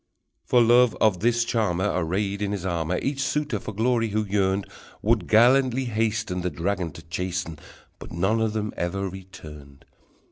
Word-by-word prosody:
For 120 -1 +4
love 120 0 +4
of 105 -5 +3
the 120 +5 +3
charmer, 110 -5 0
Arrayed 95 +4 -1
in 100 0 -1
his 95 -3 -4
armor, 85 -1 -1
Each 140 0 -1
suitor 140 -3 -1
for 110 - -7
glory 115 +2 +1
who 105 +1 -1
yearned, 100 -1 0 0.4
Would 110 -4 +1
gallantly 130 +3 +4
hasten, 110 -4 -1
The 90 - -1
dragon 85 +2 -2
to 80 - -12
chasten, 85 0 -4 0.4
But - - -10
none 95 +7 0
of 110 -1 0
them 105 -1 -3
ever 95 +3 -2
returned! 75 -7 -11
100 Hz, 165 wpm, -25 LUFS, 90-115 Hz, 0.4 s, For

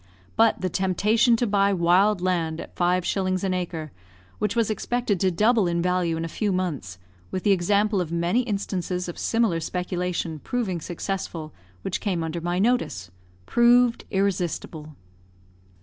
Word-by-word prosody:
But 225 0 +3
the 185 - 0
temptation 210 +7 +2
to 240 - 0
buy 200 -2 +2
wild 185 +3 +3
land 170 -3 0
at - - -9
5s. 185 +1 0
an 190 -1 0
acre, 170 -4 -4 0.5
which 210 +1 -1
was 230 -2 +1
expected 215 -1 -1
to 190 - +3
double 215 +3 +3
in 170 0 0
value 180 -2 0
in 165 - -2
a - - -3
few 205 +5 -1
months, 150 - -3 0.3
with 185 - -4
the 205 - +3
example 200 +2 +2
of 165 -2 -4
many 170 +6 +1
instances 190 -5 -3
of 175 - -7
similar 225 -7 +1
speculation 180 -1 -3
proving 190 - -2
successful 170 -3 -5 0.3
which - - -3
came 180 -5 -1
under 165 +1 -4
my 175 +1 -1
notice, 190 - 0 0.3
proved 240 - +4
irresistible. 175 -5 -2
185 Hz, 150 wpm, -25 LUFS, 170-210 Hz, 0.5 s, proved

